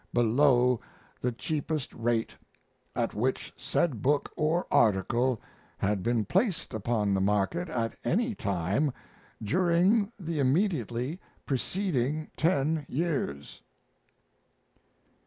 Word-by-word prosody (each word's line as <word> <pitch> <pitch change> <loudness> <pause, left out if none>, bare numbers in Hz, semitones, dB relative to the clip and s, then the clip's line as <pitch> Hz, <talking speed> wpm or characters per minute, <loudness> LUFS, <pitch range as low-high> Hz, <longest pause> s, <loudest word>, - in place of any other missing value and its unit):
below 125 +1 +4 0.4
the 125 - +1
cheapest 150 +3 -3
rate 115 0 0 0.6
at - - 0
which 130 +5 -1
said 135 -2 0
book 145 +2 +1
or 160 +3 +1
article 120 +4 +3 0.4
had 100 -1 0
been 115 0 +1
placed 190 - 0
upon 110 -2 0
the 95 - +1
market 105 - +1
at 115 -2 -2
any 225 - +1
time 100 - 0 0.5
during 185 - +3
the 165 -4 -3
immediately 140 - 0 0.3
preceding 150 0 -1
ten 155 -1 +1
years. 135 - -2
130 Hz, 100 wpm, -29 LUFS, 115-165 Hz, 0.6 s, below